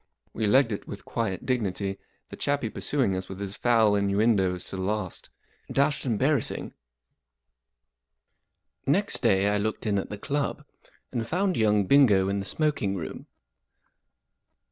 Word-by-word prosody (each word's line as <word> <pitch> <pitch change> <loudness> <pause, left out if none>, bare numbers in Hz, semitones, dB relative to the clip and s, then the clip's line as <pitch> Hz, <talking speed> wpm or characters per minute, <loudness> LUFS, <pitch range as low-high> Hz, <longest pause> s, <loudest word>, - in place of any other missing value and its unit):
We 110 -1 -1
legged 130 +2 +4
it 105 - -5
with 100 - -8
quiet 110 -6 -3
dignity, 100 -5 -1 0.3
the - - -8
chappie 140 -6 -1
pursuing 130 -10 0
us 95 0 -5
with 95 - -7
his 100 0 -5
foul 115 -4 +3
innuendoes 100 -2 +2
to - - -5
the 95 - -4
last. 100 -1 -3 0.4
Dashed 140 0 +1
embarrassing. 130 +3 0 2.1
N - - +5
EXT - - 0
day 95 +1 +3
I 105 0 +1
looked 110 +3 -3
in 100 -2 +1
at - - -5
the 105 - -5
club, 140 +6 -2 0.5
and 115 -3 -3
found 185 +4 0
young 105 -2 +3
Bingo 105 -7 +5
in 100 0 -1
the 100 - -5
smoking 145 -11 0
room. 85 -4 -6
105 Hz, 145 wpm, -27 LUFS, 100-130 Hz, 2.1 s, N